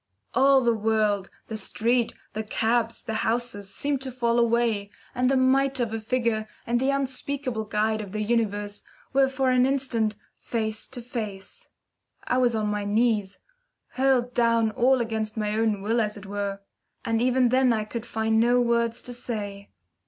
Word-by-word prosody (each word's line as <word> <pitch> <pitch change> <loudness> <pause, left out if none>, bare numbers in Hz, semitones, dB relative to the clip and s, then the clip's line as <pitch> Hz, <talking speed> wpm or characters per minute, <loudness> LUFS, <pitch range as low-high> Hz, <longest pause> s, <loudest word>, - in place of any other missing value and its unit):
All 270 0 +5
the 235 -2 +3
world, 215 -3 +1 0.2
the 220 - -5
street, 230 +3 0 0.2
the 220 - -2
cabs, 225 +1 0
the 225 - -4
houses, 225 -4 -2
seemed 280 +2 -1
to 265 -1 -4
fall 240 -1 +1
away, 230 -3 +1 0.2
and 250 +1 +1
the 270 - +3
mite 265 +1 +3
of 230 -2 -1
a 225 - -2
figure 225 -1 -1 0.2
and 240 +1 +1
the 265 +2 +1
unspeakable 270 -3 -2
Guide 215 +1 0
of 200 -3 -8
the 215 +1 -2
Universe 205 -2 0 0.3
were 270 0 +5
for 265 -1 +1
an 250 0 +4
instant 250 -6 0 0.2
face 220 -2 -3
to 250 -2 -8
face. 225 - -6 0.5
I 250 - +1
was 245 -2 +3
on 215 -1 0
my 210 0 -1
knees 210 -2 +1 0.5
hurled 255 -2 +1
down 230 -2 +3
all 255 +2 +3
against 220 -1 -3
my 210 -1 -1
own 215 -2 +1
will, 230 +3 +2
as 210 -1 -2
it 200 - -10
were. 200 0 -3 0.4
And 225 0 +1
even 255 0 +3
then 255 0 +4
I 220 -2 +1
could 230 +2 -6
find 220 0 +1
no 240 +2 +4
words 235 -1 +1
to 245 - -5
say. 205 -5 -5
230 Hz, 175 wpm, -26 LUFS, 215-250 Hz, 0.5 s, All